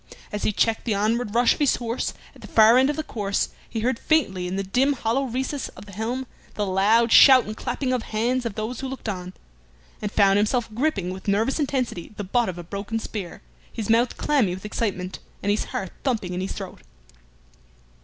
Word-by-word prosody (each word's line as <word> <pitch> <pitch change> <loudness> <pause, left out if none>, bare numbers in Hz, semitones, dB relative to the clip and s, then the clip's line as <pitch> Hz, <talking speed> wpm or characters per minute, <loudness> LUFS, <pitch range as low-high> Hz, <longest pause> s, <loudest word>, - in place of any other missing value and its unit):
As 210 - -3
he - - +1
checked 225 +2 +1
the 220 -4 +1
onward 215 +2 0
rush 240 0 +5
of - - -10
his 290 -3 +3
horse 235 0 -3 0.2
at - - -17
the - - -9
far 225 +3 +6
end 265 +2 +4
of 295 - 0
the 310 - -3
course, 200 -7 -1 0.2
he 225 - -3
heard 235 +1 0
faintly 195 - +1
in 180 - -3
the 195 - -1
dim 255 +9 +2
hollow 255 +1 0
recess 260 +3 -3
of 190 - -10
the 205 - -12
helm 230 +6 -3 0.3
the 210 - -1
loud 210 +5 +3
shout 265 -2 +9
and 215 - -6
the - - -7
clapping 255 +2 -2
of 250 - 0
hands 240 +4 -1
of 230 -4 -4
those 220 +3 -4
who 270 - -4
looked 265 -2 -7
on, 185 -3 -4 0.7
and 210 -1 -3
found 200 -1 +4
himself 220 +2 0
gripping 220 - 0
with 190 +2 -9
nervous 220 +9 +1
intensity 255 - -2
the 205 - -3
butt 230 +4 +1
of 180 - -6
a 175 - -6
broken 200 +5 -4
spear, 205 -5 -6 0.3
his 220 -2 -2
mouth 235 +2 +2
clammy 240 -12 +1
with 190 - -11
excitement, 190 -4 -3 0.2
and 205 - +2
his 210 - 0
heart 190 -3 -4
thumping 220 -9 -1
in 180 - -2
his 190 - -3
throat. 190 -3 -8
220 Hz, 215 wpm, -24 LUFS, 200-250 Hz, 0.7 s, shout